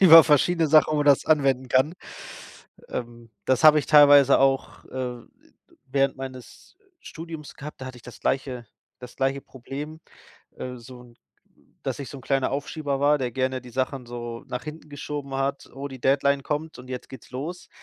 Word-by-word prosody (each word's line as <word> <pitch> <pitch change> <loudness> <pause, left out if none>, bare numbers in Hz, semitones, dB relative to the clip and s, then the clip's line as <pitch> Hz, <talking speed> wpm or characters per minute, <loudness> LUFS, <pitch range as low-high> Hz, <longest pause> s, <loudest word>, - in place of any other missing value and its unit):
über 165 -4 +10
verschiedene 160 +3 +3
Sachen, 155 0 +5
wo 150 - +2
das 145 -2 +4
anwenden 135 -4 +2
kann. 130 +5 +3 1.0
Ähm, 120 -1 -7 0.2
das 130 +4 +2
habe 155 0 +9
ich - - -1
teilweise 145 -2 +7
auch, 135 0 +1
äh, 125 -2 -5 0.7
während 135 0 +1
meines 130 - -10 0.2
Studiums 160 -2 -9
gehabt, 150 0 -9
da - - -5
hatte 130 -1 -8
ich - - -19
das 125 - -12
gleiche 130 -3 -2 0.3
das 125 -1 -11
gleiche 135 +1 0
Problem, 145 +5 -8 0.6
äh, 125 0 -6
so 125 +1 -12
'n 120 -1 -18 0.7
dass - - -3
ich 140 - -6
so 140 - -8
'n - - -14
kleiner 135 +1 0
Aufschieber 140 0 -3
war, 145 +1 +4
der 125 -3 -2
gerne 130 +1 -1
die 125 - -12
Sachen 130 0 -2
so 120 -1 -7
nach 125 - -5
hinten 155 0 -9
geschoben 145 -1 -6
hat. 135 +1 -2
„Oh, 140 +1 -5
die 130 -2 -10
Deadline 140 +2 +2
kommt 155 +3 -4
und 125 +1 -12
jetzt 125 -1 -6
geht's 130 -4 -12
los.“ 160 +8 -6
135 Hz, 180 wpm, -25 LUFS, 130-150 Hz, 1.0 s, über